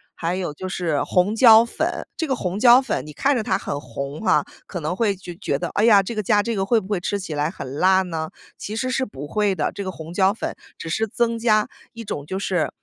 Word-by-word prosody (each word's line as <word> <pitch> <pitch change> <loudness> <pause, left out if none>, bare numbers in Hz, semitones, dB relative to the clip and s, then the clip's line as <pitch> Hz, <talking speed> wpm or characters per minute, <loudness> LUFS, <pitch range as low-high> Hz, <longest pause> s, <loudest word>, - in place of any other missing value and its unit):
还 170 +2 -2
有 180 -5 -3
就 185 +5 -6
是 170 -6 -1
红 185 +3 +1
椒 225 -1 +8
粉， - - -3
这 325 - -2
个 265 - 0
红 185 -2 -3
椒 245 +2 +7
粉 245 - -3
你 150 - -9
看 275 - +1
着 - - 0
它 - - 0
很 145 - -4
红 140 +3 -6
哈， 220 - +3 0.2
可 175 -4 -5
能 155 +4 -2
会 205 -1 +1
觉 180 -1 -9
觉 145 -8 -1
得： - - -3
“哎 210 - +3
呀， 205 -4 +6
这 215 - -5
个 215 - -1
加 205 0 +2
这 230 -2 -2
个 195 - 0
会 230 +2 +3
不 190 - -12
会 205 -4 0
吃 200 +3 -2
起 185 -5 -6
来 150 +2 0
很 140 -7 -7
辣 190 +1 +5
呢？” 160 -3 -4 0.3
其 210 - -5
实 255 +3 -2
是 260 0 0
不 145 - -8
会 205 +2 0
的。 150 - -1
这 200 - -7
个 190 - -4
红 165 -1 -9
椒 190 +1 +3
粉 225 - -4 0.2
只 165 - -7
是 220 +7 0
增 230 +2 0
加 215 -2 +2 0.2
一 230 - -8
种 145 -9 -5
就 190 +5 -4
是 185 -4 0
195 Hz, 280 characters per minute, -22 LUFS, 165-220 Hz, 0.3 s, 椒